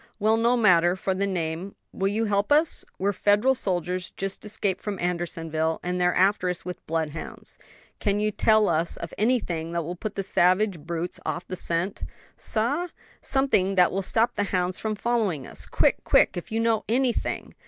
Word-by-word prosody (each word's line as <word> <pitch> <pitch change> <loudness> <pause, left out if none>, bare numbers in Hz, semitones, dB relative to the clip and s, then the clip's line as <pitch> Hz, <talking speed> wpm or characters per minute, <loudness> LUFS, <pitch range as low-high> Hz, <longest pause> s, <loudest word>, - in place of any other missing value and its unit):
"Well, 220 +1 +3
no 235 +2 +2
matter 175 -5 +4
for 190 0 -1
the 200 +2 -1
name; 175 +1 -3 0.2
will 195 - -1
you 215 +3 0
help 205 +3 0
us? 310 +3 +3
We're 200 +2 0
Federal 210 +7 +3
soldiers 180 -5 -1
just 195 0 -5
escaped 200 -3 -2
from 205 -2 -4
Andersonville, 165 -2 -1
and 180 0 -2
they're 180 0 +2
after 190 -1 +3
us 180 0 -3
with 180 -1 -6
bloodhounds. 160 -1 -4 0.4
Can 205 -1 0
you 215 0 +1
tell 215 +1 +3
us 165 +1 0
of 170 - -7
anything 180 -8 0
that 170 -1 -1
will 175 +3 -5
put 210 +3 -5
the 195 - -2
savage 185 0 +2
brutes 170 +3 -4
off 175 - -3
the 185 - -4
scent?" 170 +2 -1 0.3
"Sah?" 275 +11 -1 0.3
"Something 270 -9 +1
that 180 -1 +5
will 195 - -1
stop 225 +5 +1
the 205 - -1
hounds 180 -1 -1
from 215 -1 -2
following 210 - -1
us - - -5
quick, - - +1
quick! - - +4
if 175 - -6
you 225 - 0
know 225 -1 +1
anything." 245 +1 0
190 Hz, 185 wpm, -25 LUFS, 175-215 Hz, 0.4 s, that